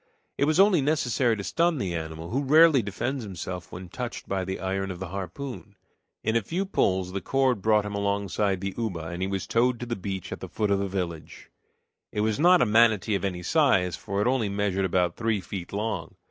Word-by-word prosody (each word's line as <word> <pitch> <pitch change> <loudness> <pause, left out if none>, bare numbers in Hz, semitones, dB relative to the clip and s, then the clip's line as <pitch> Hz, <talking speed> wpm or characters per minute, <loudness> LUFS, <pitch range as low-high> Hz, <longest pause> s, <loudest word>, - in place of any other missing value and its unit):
It 140 - +2
was 155 +4 +2
only 195 -5 +6
necessary 130 -5 +1
to 100 - -5
stun 170 - +1
the 95 -9 -2
animal, 80 0 -5
who 135 +4 0
rarely 155 0 +6
defends 115 +6 -3
himself 90 -2 -6
when 90 +1 -8
touched 120 +6 -6
by 95 -1 -1
the 95 +1 -4
iron 95 +1 -2
of 90 - -5
the 95 -1 -6
harpoon. 100 - -6 0.5
In 110 +1 0
a 115 - +3
few 175 - -2
pulls 95 - 0
the 100 +1 -3
cord 130 -5 +1
brought 105 0 +3
him 105 - -5
alongside 100 -1 0
the 100 0 -3
uba, 90 -8 -3
and 85 +1 -5
he 95 - 0
was 95 -1 -3
towed 120 +1 +1
to 120 - -4
the 120 -1 -3
beach 95 -2 -5
at - - -5
the - - -7
foot 105 -2 -1
of 100 - +3
the 100 - -1
village. 90 -4 -5 0.6
It 105 - -1
was 110 +2 0
not 180 +2 +6
a - - +2
manatee 110 -1 +4
of 100 - -1
any 90 -3 -2
size, 95 - +3
for 100 +1 -4
it - - +1
only 125 -5 +1
measured 100 -1 0
about 90 -1 +1
three 115 -2 0
feet 90 0 -7
long. 110 +2 -3
100 Hz, 220 wpm, -26 LUFS, 95-120 Hz, 0.6 s, only